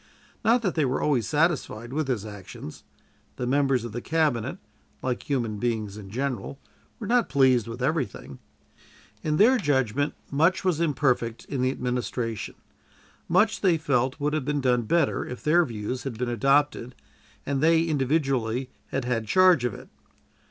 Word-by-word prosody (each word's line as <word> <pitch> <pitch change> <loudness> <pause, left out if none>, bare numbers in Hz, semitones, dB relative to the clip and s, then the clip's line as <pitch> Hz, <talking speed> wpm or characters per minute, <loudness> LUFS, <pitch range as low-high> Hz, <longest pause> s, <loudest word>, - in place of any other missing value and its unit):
Not 235 +2 +3
that 190 - 0
they 155 - +1
were 130 -1 0
always 130 -7 +1
satisfied 145 -7 0
with 155 -1 -1
his 115 -6 -1
actions; 100 -7 -9 0.5
the 125 - -3
members 135 -2 +1
of 120 - -6
the 120 +3 -5
Cabinet, 150 -8 0 0.5
like 125 +1 -3
human 115 -7 -1
beings 110 -3 -2
in 105 -2 -9
general, 130 +1 -3 0.4
were 220 - -7
not 240 +2 +2
pleased 130 -5 +3
with 115 +2 -6
everything. 135 - -2 0.8
In 150 -1 0
their 245 +7 +5
judgment 140 - 0 0.2
much 160 +6 +2
was 170 -3 +1
imperfect 130 -7 0
in 135 -3 -3
the 130 - +2
administration; 125 -3 -3 0.7
much, 205 +6 +3
they 180 -4 +3
felt, 135 -4 0
would 145 +1 0
have 155 -3 0
been 145 +1 -1
done 125 -3 +1
better 170 -4 +2
if 125 - -8
their 170 +3 +4
views 115 +1 -4
had 130 -5 -5
been 125 +1 -2
adopted 135 +1 +1 0.5
and 140 -1 -1
they 165 +1 +4
individually 135 -5 0 0.2
had 135 -2 -3
had 115 -3 -1
charge 185 - +5
of 115 -5 -2
it. - - -11
135 Hz, 160 wpm, -26 LUFS, 120-155 Hz, 0.8 s, their